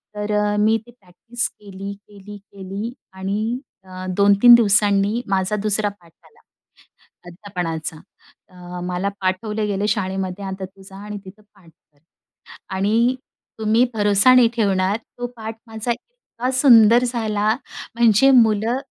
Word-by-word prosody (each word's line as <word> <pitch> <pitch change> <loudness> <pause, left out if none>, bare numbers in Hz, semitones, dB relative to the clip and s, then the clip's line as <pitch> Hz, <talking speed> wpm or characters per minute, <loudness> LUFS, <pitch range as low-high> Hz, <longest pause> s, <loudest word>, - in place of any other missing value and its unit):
तर 210 0 -4 0.3
मी 220 +2 +3
ते - - -14
प्रॅक्टिस 230 +2 -5
केली, 200 -1 -9
केली, 205 0 -13
केली 200 +3 -8 0.2
आणि 205 +6 -3 0.2
अ, 185 0 -9
2-3 200 +4 +6
दिवसांनी 205 0 +2
माझा 195 +1 0
दुसरा 210 0 0
पाठ 175 -5 -18
आला, - - -23 0.9
अध्यापनाचा. 175 -4 -5 0.5
अ, 180 -1 -10
मला 180 +2 -2
पाठवले 210 +3 -1
गेले 205 0 -1
शाळेमध्ये 190 -1 -2
आता 190 0 -5
तू 195 +1 -18
जा 190 0 -14
आणि 210 0 -6
तिथं 195 +3 -13
पाठ 185 -4 -20
कर. 150 -2 -33 0.8
आणि 225 +6 +2 0.4
तुम्ही 220 +2 +3
भरोसा 205 +3 +4
नाही 250 -2 +6
ठेवणार, 195 -2 +1
तो 245 +2 -8
पाठ 220 0 -6
माझा 225 +1 -3
इतका 255 - -7
सुंदर 235 -3 +6
झाला. 220 -4 -1 0.5
म्हणजे 235 +2 +4
मुलं 225 -1 +3
205 Hz, 130 wpm, -20 LUFS, 190-225 Hz, 0.9 s, 2-3